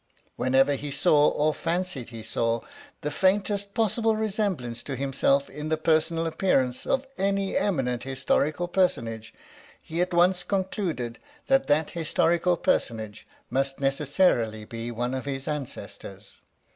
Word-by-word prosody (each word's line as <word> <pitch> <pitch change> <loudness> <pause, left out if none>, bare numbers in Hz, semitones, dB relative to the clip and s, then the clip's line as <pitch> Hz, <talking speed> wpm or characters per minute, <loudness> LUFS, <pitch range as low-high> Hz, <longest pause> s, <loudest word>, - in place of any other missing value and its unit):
Whenever 135 +2 +3
he 145 +1 -4
saw, 145 +1 +4
or 155 +1 +1
fancied 170 -7 -2
he 115 -2 -8
saw, 115 +1 0 0.4
the 150 - -2
faintest 200 +3 +1
possible 225 0 +2
resemblance 195 - -2
to 140 - -5
himself 140 +1 +1
in 150 +2 -6
the 160 - +1
personal 165 +1 +1
appearance 135 -7 +1
of 270 0 +1
any 195 0 0
eminent 130 - 0
historical 140 +5 0
personage, 115 - 0 0.5
he 165 +2 -3
at 180 - 0
once 180 +1 +4
concluded 180 - -2 0.3
that 270 0 +3
that 150 +1 +2
historical 170 +1 +1
personage 110 -7 -1 0.2
must 135 0 0
necessarily 135 - +1
be 115 +1 -6
one 120 +2 -2
of 130 0 -3
his 135 -1 -4
ancestors. 150 -4 -6
150 Hz, 135 wpm, -26 LUFS, 130-180 Hz, 0.5 s, saw